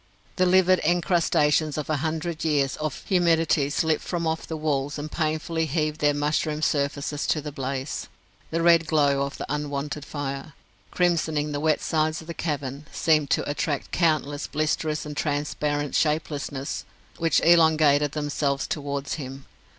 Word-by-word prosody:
The 185 Hz, 0 st, +3 dB
livid 185 Hz, 0 st, +5 dB
encrustations 160 Hz, -3 st, +2 dB
of 150 Hz, -, -3 dB
a 155 Hz, -, 0 dB
hundred 160 Hz, +2 st, -3 dB
years 145 Hz, -4 st, +1 dB
of 155 Hz, -3 st, -4 dB
humidity 165 Hz, -5 st, +2 dB
slipped 155 Hz, +2 st, +1 dB
from 170 Hz, -2 st, -3 dB
off 160 Hz, 0 st, -2 dB
the 160 Hz, -, -4 dB
walls 145 Hz, -2 st, -1 dB
and 150 Hz, +1 st, -6 dB
painfully 160 Hz, 0 st, -1 dB
heaved 155 Hz, 0 st, -1 dB
their 145 Hz, -1 st, +3 dB
mushroom 150 Hz, +1 st, 0 dB
surfaces 145 Hz, 0 st, -1 dB
to 155 Hz, -, +2 dB
the 150 Hz, 0 st, -6 dB
blaze. 135 Hz, 0 st, -4 dB, 0.4 s
The 165 Hz, +1 st, -1 dB
red 165 Hz, -1 st, +5 dB
glow 145 Hz, -3 st, +3 dB
of 140 Hz, 0 st, -3 dB
the -, -, -4 dB
unwonted 145 Hz, 0 st, -3 dB
fire, 140 Hz, 0 st, -5 dB, 0.4 s
crimsoning 160 Hz, -4 st, +1 dB
the 145 Hz, -, -2 dB
wet 155 Hz, -1 st, +2 dB
sides 155 Hz, 0 st, 0 dB
of 160 Hz, -, -11 dB
the 170 Hz, -, -6 dB
cavern, 145 Hz, -3 st, -4 dB
seemed 155 Hz, -3 st, +2 dB
to -, -, +1 dB
attract 145 Hz, 0 st, -2 dB
countless 155 Hz, -4 st, +1 dB
blisterous 155 Hz, 0 st, -1 dB
and 150 Hz, 0 st, -6 dB
transparent 145 Hz, 0 st, -1 dB
shapelessnesses, 150 Hz, -3 st, -1 dB, 0.4 s
which 165 Hz, -1 st, +3 dB
elongated 155 Hz, -4 st, +4 dB
themselves 145 Hz, -2 st, -1 dB
towards 140 Hz, -1 st, -3 dB
him. 135 Hz, 0 st, -8 dB
150 Hz, 150 wpm, -25 LUFS, 145-160 Hz, 0.4 s, livid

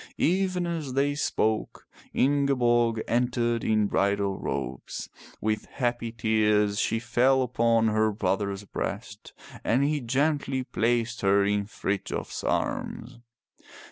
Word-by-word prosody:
Even 185 Hz, 0 st, +1 dB
as 160 Hz, -6 st, -3 dB
they 140 Hz, +2 st, +2 dB
spoke 110 Hz, -6 st, -1 dB, 0.3 s
Ingeborg 120 Hz, -5 st, +2 dB
entered 120 Hz, -1 st, +1 dB
in 110 Hz, -1 st, +2 dB
bridal 100 Hz, -1 st, 0 dB
robes. 60 Hz, +1 st, -5 dB, 0.3 s
With 110 Hz, 0 st, -1 dB
happy 120 Hz, -3 st, -2 dB
tears 105 Hz, -2 st, +2 dB
she 115 Hz, -, +1 dB
fell 125 Hz, +3 st, +2 dB
upon 115 Hz, -2 st, +2 dB
her 110 Hz, 0 st, +2 dB
brother's 100 Hz, 0 st, -1 dB
breast 105 Hz, +1 st, -6 dB, 0.3 s
and 125 Hz, +5 st, +2 dB
he 145 Hz, 0 st, +1 dB
gently 135 Hz, +1 st, 0 dB
placed 115 Hz, -1 st, 0 dB
her 100 Hz, 0 st, +3 dB
in 100 Hz, 0 st, 0 dB
Frithjof's 100 Hz, -2 st, -3 dB
arms. 120 Hz, +1 st, -2 dB
115 Hz, 110 wpm, -27 LUFS, 105-130 Hz, 0.3 s, her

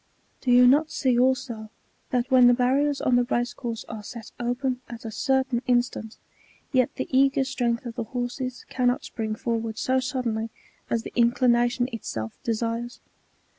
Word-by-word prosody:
Do 255 Hz, -, -2 dB
you 250 Hz, 0 st, +7 dB
not 290 Hz, +5 st, +5 dB
see 255 Hz, -3 st, +1 dB
also, 255 Hz, -4 st, 0 dB, 0.4 s
that 250 Hz, +1 st, -1 dB
when 255 Hz, -1 st, +7 dB
the 245 Hz, -, +6 dB
barriers 275 Hz, +3 st, +2 dB
on 250 Hz, -1 st, +3 dB
the 245 Hz, -, +4 dB
race 240 Hz, 0 st, -1 dB
course 230 Hz, -3 st, -5 dB
are 220 Hz, -1 st, -6 dB
set 225 Hz, +2 st, -9 dB
open 250 Hz, +1 st, -1 dB
at 235 Hz, -1 st, -9 dB
a 225 Hz, -, -4 dB
certain 265 Hz, +1 st, +1 dB
in 245 Hz, -1 st, +4 dB
stant, 225 Hz, -2 st, -8 dB, 0.6 s
yet 255 Hz, -2 st, +2 dB
the -, -, -3 dB
eager 270 Hz, 0 st, +4 dB
strength 245 Hz, -3 st, -1 dB
of 235 Hz, -, -5 dB
the 230 Hz, 0 st, -4 dB
horses 250 Hz, +2 st, -4 dB
cannot 250 Hz, +2 st, 0 dB
spring 220 Hz, -2 st, -3 dB
for 230 Hz, +1 st, -1 dB
ward 225 Hz, -1 st, -5 dB
so 260 Hz, +3 st, +1 dB
suddenly 240 Hz, -4 st, -2 dB, 0.4 s
as 230 Hz, -1 st, 0 dB
the -, -, -8 dB
inclination 240 Hz, 0 st, +3 dB
itself 110 Hz, -, -5 dB
desires 230 Hz, +1 st, -2 dB
245 Hz, 170 wpm, -25 LUFS, 230-255 Hz, 0.6 s, you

